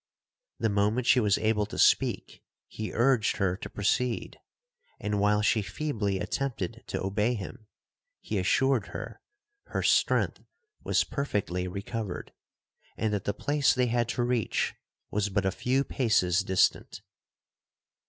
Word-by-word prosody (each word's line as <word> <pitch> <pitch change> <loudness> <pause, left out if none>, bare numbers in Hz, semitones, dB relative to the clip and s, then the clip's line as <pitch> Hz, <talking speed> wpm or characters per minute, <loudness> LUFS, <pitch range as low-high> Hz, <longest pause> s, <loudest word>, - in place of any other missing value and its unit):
The - - +1
moment 105 +4 +1
she 130 - +5
was 105 -4 +3
able 110 -1 +1
to - - -8
speak - - +2 0.3
he 110 0 -5
urged 120 -1 +2
her 95 -2 +1
to - - -7
proceed,—and 125 - -3
while 105 +1 +3
she 110 +1 +3
feebly 105 -5 -2
attempted 120 -4 -3
to - - -3
obey 105 +5 +1
him, 105 +1 -8 0.5
he 105 - -3
assured 130 +4 +2
her, - - -8 0.5
her - - -2
strength - - +2 0.4
was - - +2
perfectly 100 -10 -2
recovered, 100 +1 -5 0.6
and 110 -1 0
that 100 - -2
the 100 - 0
place 145 -1 +2
they 125 -1 +2
had 120 -1 +1
to 120 - 0
reach 120 -2 0 0.4
was 105 0 0
but 95 0 0
a 95 - +2
few 130 +6 0
paces 105 -9 +2
distant. 95 -1 +1
105 Hz, 135 wpm, -28 LUFS, 100-125 Hz, 0.6 s, she